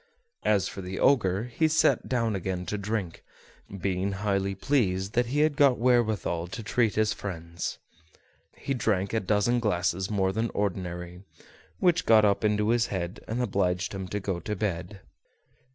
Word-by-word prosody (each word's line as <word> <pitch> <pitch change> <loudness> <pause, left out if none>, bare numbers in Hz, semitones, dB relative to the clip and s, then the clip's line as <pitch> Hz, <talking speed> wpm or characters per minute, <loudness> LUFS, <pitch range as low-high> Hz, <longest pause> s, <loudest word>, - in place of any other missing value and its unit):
As 100 -3 +2
for 95 - -7
the 90 +1 -5
Ogre, 100 -8 +3
he 125 +6 0
sat 160 +1 +2
down 115 -4 0
again 90 -1 -3
to 105 - -3
drink, 100 -4 -3 0.6
being 95 +1 -1
highly 100 -1 -1
pleased 100 -4 0
that 120 0 +2
he 145 +5 +1
had 155 -1 +2
got 140 -4 +4
wherewithal 110 -8 +1
to 100 +5 -7
treat 110 0 +1
his 110 0 +2
friends. 85 -3 -5 0.8
He 135 - -3
drank 100 -6 0
a 110 - +2
dozen 105 +4 +1
glasses 95 -3 0
more 95 -3 +1
than 110 +3 -1
ordinary, 90 -3 -3 0.6
which 175 - +2
got 110 -2 +6
up 100 0 +2
into 105 0 +2
his 120 0 +2
head 90 +1 -4
and 120 +3 -1
obliged 90 -4 0
him 95 -1 -5
to 105 +3 -3
go 95 -3 -3
to 105 +5 -4
bed. 95 -1 -3
100 Hz, 165 wpm, -27 LUFS, 95-115 Hz, 0.8 s, got